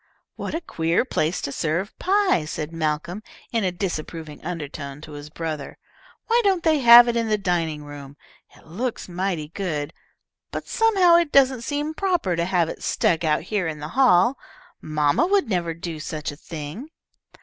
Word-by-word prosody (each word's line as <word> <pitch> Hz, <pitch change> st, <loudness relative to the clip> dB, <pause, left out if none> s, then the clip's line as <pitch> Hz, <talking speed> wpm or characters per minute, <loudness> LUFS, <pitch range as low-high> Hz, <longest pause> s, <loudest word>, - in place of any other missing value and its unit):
"What -, -, -5 dB
a 330 Hz, -, -2 dB
queer 165 Hz, -, 0 dB
place 165 Hz, -8 st, -1 dB
to 140 Hz, -, -3 dB
serve 165 Hz, +7 st, -2 dB
pie," 385 Hz, -, +2 dB
said 150 Hz, 0 st, -5 dB
Malcolm, 160 Hz, +4 st, -2 dB, 0.3 s
in 230 Hz, -2 st, 0 dB
a 185 Hz, -, +1 dB
disapproving 165 Hz, -4 st, -5 dB
undertone 145 Hz, -4 st, -6 dB
to 155 Hz, -, -11 dB
his 145 Hz, 0 st, -9 dB
brother. 155 Hz, -2 st, -5 dB, 0.5 s
"Why 470 Hz, +1 st, +3 dB
don't 380 Hz, -4 st, +2 dB
they 315 Hz, -2 st, +3 dB
have 240 Hz, -1 st, +9 dB
it 235 Hz, -, 0 dB
in 230 Hz, -1 st, 0 dB
the 215 Hz, -, +2 dB
dining 165 Hz, -6 st, -1 dB
room? 145 Hz, -1 st, -10 dB, 0.4 s
It -, -, -20 dB
looks 225 Hz, +10 st, -4 dB
mighty 180 Hz, -4 st, -3 dB
good, 160 Hz, -5 st, -3 dB, 0.6 s
but -, -, -6 dB
somehow 385 Hz, -7 st, +4 dB
it 340 Hz, -4 st, +1 dB
doesn't 260 Hz, -3 st, +4 dB
seem 290 Hz, +5 st, -2 dB
proper 345 Hz, -, 0 dB
to 170 Hz, 0 st, 0 dB
have 175 Hz, -2 st, +1 dB
it -, -, -7 dB
stuck 170 Hz, -1 st, +1 dB
out 155 Hz, -1 st, +1 dB
here 190 Hz, -1 st, -1 dB
in 155 Hz, -1 st, -4 dB
the 150 Hz, +1 st, -7 dB
hall. 245 Hz, 0 st, +4 dB, 0.4 s
Mamma 150 Hz, -, +1 dB
would 395 Hz, -4 st, +2 dB
never 170 Hz, -5 st, -1 dB
do 170 Hz, -1 st, -6 dB
such 155 Hz, -1 st, -4 dB
a -, -, -10 dB
thing." 160 Hz, -, -8 dB
175 Hz, 175 wpm, -23 LUFS, 155-250 Hz, 0.6 s, have